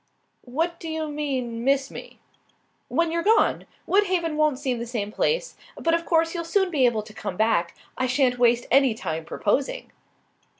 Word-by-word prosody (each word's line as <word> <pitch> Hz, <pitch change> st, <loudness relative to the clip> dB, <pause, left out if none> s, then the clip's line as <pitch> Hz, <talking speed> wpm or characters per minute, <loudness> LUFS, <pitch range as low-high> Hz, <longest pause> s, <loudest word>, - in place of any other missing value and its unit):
"What 330 Hz, +7 st, -2 dB
do 330 Hz, -, -6 dB
you 315 Hz, -1 st, -3 dB
mean, 260 Hz, -6 st, -3 dB
miss 270 Hz, +1 st, +1 dB
me?" -, -, -10 dB, 0.7 s
"When 335 Hz, -1 st, +1 dB
you're 335 Hz, 0 st, 0 dB
gone. 435 Hz, +5 st, +2 dB, 0.2 s
Woodhaven 365 Hz, -5 st, +1 dB
won't 305 Hz, -3 st, +2 dB
seem 260 Hz, -4 st, -2 dB
the 235 Hz, -, -5 dB
same 215 Hz, -4 st, -3 dB
place. -, -, -1 dB, 0.2 s
But 330 Hz, -, +1 dB
of 335 Hz, 0 st, 0 dB
course 330 Hz, -1 st, +2 dB
you'll 340 Hz, -2 st, -3 dB
soon 380 Hz, +2 st, +1 dB
be 270 Hz, -6 st, +4 dB
able 220 Hz, -3 st, 0 dB
to 215 Hz, 0 st, -13 dB
come 200 Hz, -4 st, -5 dB
back. 200 Hz, -6 st, +1 dB, 0.2 s
I 255 Hz, -, +1 dB
sha'n't 255 Hz, -1 st, +1 dB
waste 240 Hz, 0 st, +3 dB
any 265 Hz, -4 st, +4 dB
time 160 Hz, -6 st, -4 dB
proposing." 275 Hz, -, -1 dB
275 Hz, 175 wpm, -24 LUFS, 235-330 Hz, 0.7 s, be